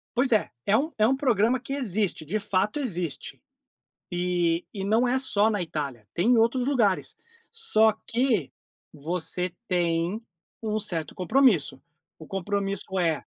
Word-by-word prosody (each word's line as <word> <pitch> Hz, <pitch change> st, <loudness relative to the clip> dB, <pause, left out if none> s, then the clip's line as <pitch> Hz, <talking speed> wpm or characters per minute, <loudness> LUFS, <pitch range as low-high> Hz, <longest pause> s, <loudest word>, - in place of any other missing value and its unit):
Pois 250 Hz, +1 st, +2 dB
é. 215 Hz, -, +3 dB, 0.2 s
É 205 Hz, +2 st, +4 dB
um 310 Hz, +4 st, -1 dB
é 215 Hz, +1 st, +4 dB
um 265 Hz, -, +3 dB
programa 245 Hz, -2 st, +2 dB
que 275 Hz, +3 st, -6 dB
existe, 205 Hz, -, -1 dB
de 210 Hz, +8 st, -1 dB
fato 205 Hz, +6 st, 0 dB
existe. 180 Hz, -, -3 dB, 0.7 s
E 175 Hz, -1 st, 0 dB
e 195 Hz, -2 st, -4 dB
não 225 Hz, +5 st, +2 dB
é 255 Hz, +2 st, +2 dB
só 220 Hz, -4 st, +2 dB
na 205 Hz, -4 st, -1 dB
Itália, 140 Hz, -10 st, -5 dB
tem 185 Hz, +8 st, +1 dB
em 240 Hz, -, +5 dB
outros 245 Hz, +3 st, +2 dB
lugares. 225 Hz, -9 st, +1 dB, 0.3 s
Só 220 Hz, -, +4 dB
que 225 Hz, -, 0 dB, 0.4 s
você 170 Hz, +3 st, -2 dB, 0.2 s
tem 175 Hz, +3 st, 0 dB, 0.4 s
um 215 Hz, -1 st, -1 dB
certo 165 Hz, -7 st, -2 dB
compromisso. 185 Hz, -, +2 dB, 0.4 s
O 160 Hz, -, -10 dB
compromisso 195 Hz, +1 st, -2 dB
com 190 Hz, 0 st, -3 dB
É. 165 Hz, -4 st, 0 dB
200 Hz, 150 wpm, -26 LUFS, 175-235 Hz, 0.7 s, em